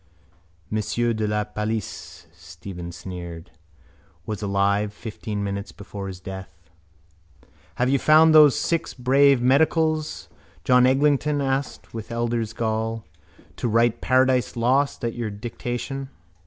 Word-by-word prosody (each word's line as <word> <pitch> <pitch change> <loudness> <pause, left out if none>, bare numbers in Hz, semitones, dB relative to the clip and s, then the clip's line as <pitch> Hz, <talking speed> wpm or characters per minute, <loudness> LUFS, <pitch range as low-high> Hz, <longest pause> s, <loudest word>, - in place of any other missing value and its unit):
—Monsieur 115 +2 0
de 110 -1 -1
la 105 0 0
Palice, 105 0 -5
Stephen 90 0 -9
sneered, 85 -2 -8 0.7
was 105 -1 -4
alive 100 +1 +1
fifteen 105 -1 -6
minutes 100 0 -4
before 100 -1 -8
his 95 -2 -7
death. 95 -3 -10 1.0
—Have 125 - +1
you 135 +1 +2
found 155 +2 +6
those 150 -3 +8
six 165 -1 -1
brave 135 0 +4
medicals, 155 +3 +1 0.4
John 125 0 +5
Eglinton 145 +2 +2
asked 135 0 -3
with 115 0 -7
elder's 115 -1 -1
gall, 110 0 -2 0.5
to - - -1
write 115 +1 +2
Paradise 130 0 +2
Lost 130 +2 +1
at 115 - -2
your 120 -3 -3
dictation? 120 +5 -5
115 Hz, 120 wpm, -24 LUFS, 100-130 Hz, 1.0 s, those